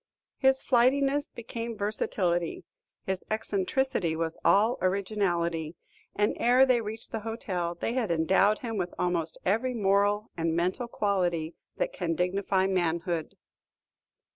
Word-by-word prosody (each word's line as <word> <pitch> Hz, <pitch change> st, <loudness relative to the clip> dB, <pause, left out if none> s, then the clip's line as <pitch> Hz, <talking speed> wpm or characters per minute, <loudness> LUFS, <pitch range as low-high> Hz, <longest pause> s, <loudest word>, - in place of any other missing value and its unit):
His 265 Hz, -1 st, +3 dB
flightiness 275 Hz, +3 st, +3 dB
became 230 Hz, -1 st, -6 dB
versatility; 180 Hz, -4 st, -1 dB, 0.4 s
his 190 Hz, -1 st, -3 dB
eccentricity 215 Hz, -3 st, 0 dB
was 165 Hz, 0 st, -3 dB
all 205 Hz, +8 st, +4 dB
originalty; 175 Hz, -4 st, 0 dB, 0.4 s
and 210 Hz, 0 st, +2 dB
ere 250 Hz, +2 st, +5 dB
they 250 Hz, -3 st, +3 dB
reached 220 Hz, +1 st, -7 dB
the 225 Hz, -, -2 dB
hotel, 190 Hz, -6 st, -3 dB
they 225 Hz, -, -2 dB
had 245 Hz, -5 st, -1 dB
endowed 190 Hz, +6 st, +3 dB
him 225 Hz, -2 st, -3 dB
with 180 Hz, -2 st, -3 dB
almost 170 Hz, -3 st, 0 dB
every 230 Hz, +6 st, +1 dB
moral 205 Hz, 0 st, +2 dB
and 165 Hz, -1 st, -1 dB
mental 185 Hz, +8 st, 0 dB
quality 175 Hz, -7 st, 0 dB, 0.2 s
that -, -, -1 dB
can 165 Hz, -, -2 dB
dignify 190 Hz, +2 st, +1 dB
manhood. 170 Hz, -3 st, -1 dB
195 Hz, 125 wpm, -28 LUFS, 175-230 Hz, 0.4 s, ere